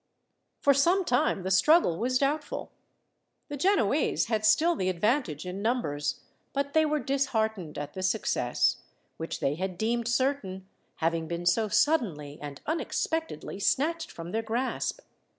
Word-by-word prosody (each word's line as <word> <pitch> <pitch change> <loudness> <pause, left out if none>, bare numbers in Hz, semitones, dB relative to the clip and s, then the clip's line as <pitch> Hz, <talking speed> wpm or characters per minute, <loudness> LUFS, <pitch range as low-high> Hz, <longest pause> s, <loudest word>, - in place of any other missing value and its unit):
For 280 - +5
some 345 +8 +3
time 245 - +1
the 190 - -2
struggle 190 - +4
was 255 +2 +1
doubtful. 285 +3 -2 0.8
The 290 - -4
Genoese 290 - +2
had 220 -2 -1
still 320 +11 +4
the 185 -9 0
advantage 185 - 0
in 180 +2 -5
numbers, 155 - -1 0.3
but 280 0 -2
they 315 -1 +4
were 300 0 +1
disheartened 220 - -1
at 145 0 -5
the 190 - -5
success, 185 - +1 0.4
which 165 - -5
they 135 - +1
had 185 +3 -4
deemed 230 +3 0
certain, 235 -7 -1 0.3
having 165 0 -1
been 170 +1 -4
so 215 +5 +3
suddenly 210 - +1
and 145 -1 -7
unexpectedly 320 -6 -2
snatched 320 - +1
from 165 +1 -8
their 225 - 0
grasp. 240 - -2
220 Hz, 145 wpm, -28 LUFS, 180-280 Hz, 0.8 s, For